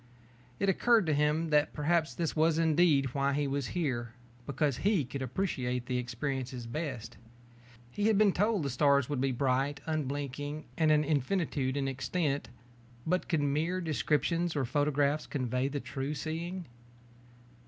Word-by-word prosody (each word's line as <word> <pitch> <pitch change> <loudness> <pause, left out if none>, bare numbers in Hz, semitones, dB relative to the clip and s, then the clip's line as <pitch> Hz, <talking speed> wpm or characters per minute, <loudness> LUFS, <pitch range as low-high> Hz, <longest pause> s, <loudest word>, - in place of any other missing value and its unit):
It 200 - +1
occurred 225 +2 +4
to 155 - +1
him 150 +3 +1
that 150 0 +3
perhaps 160 +1 +1
this 165 -2 -2
was 160 0 +3
indeed 155 -5 +3
why 140 0 +1
he 145 +1 0
was 140 -2 -1
here, 120 -8 -1 0.3
because 140 -1 0
he 190 -2 +2
could 135 +3 -6
appreciate 125 -3 -2
such 125 - -1
experiences 125 0 -3
best. 130 -4 -5 0.7
He 205 +8 0
had 220 -2 +4
been 210 -1 +5
told 205 -2 +1
the 140 - -2
stars 140 +1 +3
would 145 -3 -1
be 135 0 +1
bright, 135 +2 0
unblinking, 145 -1 -3
and 160 -2 +2
an 150 0 +4
infinitude 145 -2 0
in 135 -1 0
extent, 135 +3 -1 0.6
but 180 +3 0
could 160 -3 +2
mere 155 +6 0
descriptions 165 +1 0
or 140 -3 +1
photographs 145 +2 +1
convey 130 -1 -1
the 145 +1 -3
true 135 +2 -4
seeing? 170 +5 -4
145 Hz, 155 wpm, -31 LUFS, 135-160 Hz, 0.7 s, been